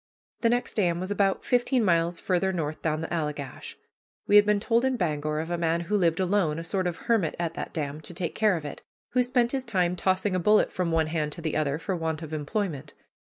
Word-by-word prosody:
The 230 - +2
next 245 +1 0
dam 175 -5 +1
was 185 +2 -4
about 195 -1 +1
fifteen 245 0 +2
miles 170 -1 +2
farther 190 +1 +1
north 155 -4 -3
down 155 -1 -1
the 165 - -4
Allegash. 150 -4 -4 0.5
We 205 - +3
had 205 0 +7
been 210 -1 +3
told 230 +3 +2
in 260 -1 +1
Bangor 150 -4 -1
of 165 +2 -4
a 175 - -1
man 165 0 +1
who 200 +5 -1
lived 170 -4 +2
alone, 185 -4 +1
a 165 - -4
sort 185 +2 -1
of 170 -2 -5
hermit, 225 -9 +1
at 170 -1 -2
that - - -5
dam, 150 -2 -4
to 165 - -6
take 170 -2 -2
care 210 -4 +2
of 155 - -7
it, 145 - -7 0.3
who 250 - +2
spent 245 -1 +1
his 270 -2 -1
time 180 -7 0
tossing 185 +2 +1
a - - +1
bullet 210 +4 +3
from 180 -2 -1
one 165 -1 +2
hand 155 -2 -2
to - - -9
the 155 - -1
other, 150 -2 0
for 185 +4 -3
want 160 -1 -3
of 160 0 -7
employment. 150 -2 -3
175 Hz, 240 wpm, -27 LUFS, 160-205 Hz, 0.5 s, had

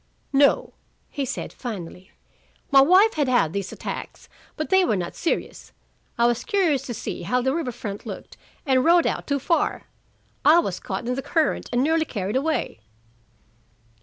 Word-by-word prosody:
"No," 280 +1 +3 0.4
he 280 - -2
said - - -5
finally. 190 -5 -7 0.6
"My 275 -1 +8
wife 375 +9 +5
had 295 -3 0
had 240 -11 +2
these 200 -2 -3
attacks, - - -7 0.3
but 310 - -4
they 380 0 +5
were 280 - +1
not 175 -2 -3
serious. 335 - -3 0.4
I 235 - +3
was 240 0 +1
curious 365 - +1
to 240 - -4
see - - -5
how 250 - 0
the 265 +1 +1
river 310 -6 -2
front 205 -3 -7
looked - - -8 0.3
and 260 -2 +3
rowed 340 +1 +5
out - - -2
too 280 - +1
far. 330 +5 0 0.6
I 310 +3 +7
was 195 - 0
caught 195 +4 -5
in 250 - 0
the 270 - -3
current 315 +1 0
and 245 +1 +2
nearly 320 +2 +2
carried 205 -5 -4
away." 300 - -1
270 Hz, 170 wpm, -24 LUFS, 235-320 Hz, 0.6 s, My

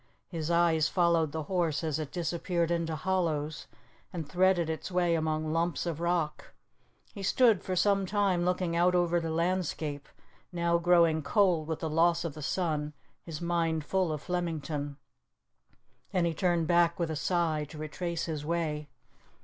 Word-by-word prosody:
His 165 -3 -4
eyes 170 -3 +3
followed 170 -4 +2
the 160 +1 -3
horse 170 -2 -1
as 155 -1 -1
it 150 -2 -5
disappeared 170 0 -1
into 165 -2 -1
hollows 155 -4 -1 0.4
and 165 -4 -5
threaded 180 +1 +2
its 160 0 -4
way 175 -1 +2
among 155 -1 -1
lumps 170 +2 0
of 165 -3 -3
rock. 170 -3 -1 0.6
He 200 - -8
stood 225 +1 +4
for 185 - -3
some 195 +1 +2
time 195 -3 +1
looking 180 -1 0
out 180 +1 +3
over 175 -1 +2
the 165 -1 -3
landscape, 160 -4 -2 0.4
now 170 -1 +1
growing 170 -2 +4
cold 175 -2 +2
with 160 -1 -3
the 160 - -1
loss 170 +2 +3
of 165 - -3
the 155 - -9
sun, 150 -2 -1 0.3
his 160 -2 -7
mind 165 -3 0
full 185 0 0
of 150 -2 -4
Flemington. 155 -5 -3 1.1
Then 180 -2 +1
he 170 - 0
turned 175 -1 +1
back 170 0 +3
with 170 -2 -1
a - - -2
sigh 155 -1 0
to 155 - -10
retrace 165 +2 -3
his 155 -3 -4
way. 150 -2 -2
170 Hz, 165 wpm, -30 LUFS, 155-175 Hz, 1.1 s, stood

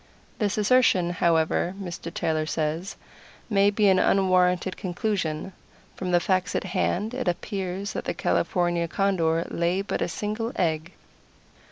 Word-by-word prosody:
This 205 -2 0
assertion, 210 -5 +3
however, 170 +1 +1
Mr. 175 -3 -6
Taylor 155 -2 -1
says, 160 +5 -2 0.6
may 200 0 +5
be 205 0 +2
an 190 -1 +5
unwarranted 185 -1 +2
conclusion. 185 -2 -2 0.4
From 185 - -4
the 175 -1 +4
facts 185 +1 0
at - - 0
hand, 190 +3 -1
it 255 -4 -3
appears 190 +2 -3
that - - -4
the - - -2
California 175 -2 0
Condor 165 -3 +1
lays 175 +3 0
but - - -2
a - - +1
single 215 +7 -3
egg. 165 -1 -1
185 Hz, 140 wpm, -25 LUFS, 170-200 Hz, 0.6 s, may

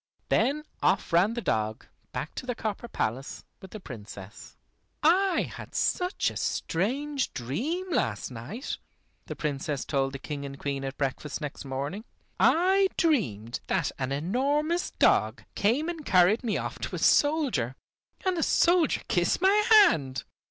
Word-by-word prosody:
Then 295 +3 +2 0.2
off 185 -2 +1
ran 190 +7 +4
the 235 - -2
dog, 110 0 -1 0.3
back 155 - -4
to 255 - -7
the 245 - -1
copper 220 +2 -4
palace 130 - -3 0.2
with 190 - -10
the 215 - -8
Princess. 105 - -10 0.5
"I 365 +4 +4
had - - -10
such 360 +1 +1
a - - -7
strange 270 - -1
dream 235 - -2
last 120 - -1
night," 135 - -6 0.5
the - - -5
Princess 145 -2 -3
told 135 -2 0
the - - -4
King 140 +1 -6
and 140 0 -7
Queen 140 -1 -3
at 135 0 -5
breakfast 140 +1 -3
next 150 -2 -6
morning. 140 +10 -4 0.4
"I 380 +3 +4
dreamed 125 - 0
that - - 0
an 130 0 -2
enormous 280 - 0
dog - - +2
came 245 +10 +1
and 335 -3 -4
carried 190 +1 +4
me 225 -4 0
off - - -4
to - - -4
a - - -3
soldier, 280 - +2 0.5
and 375 -1 +2
the 330 - -1
soldier 345 -1 +3
kissed 175 -1 +1
my 380 +2 +4 0.2
hand. 150 - +5
190 Hz, 150 wpm, -28 LUFS, -, 0.5 s, hand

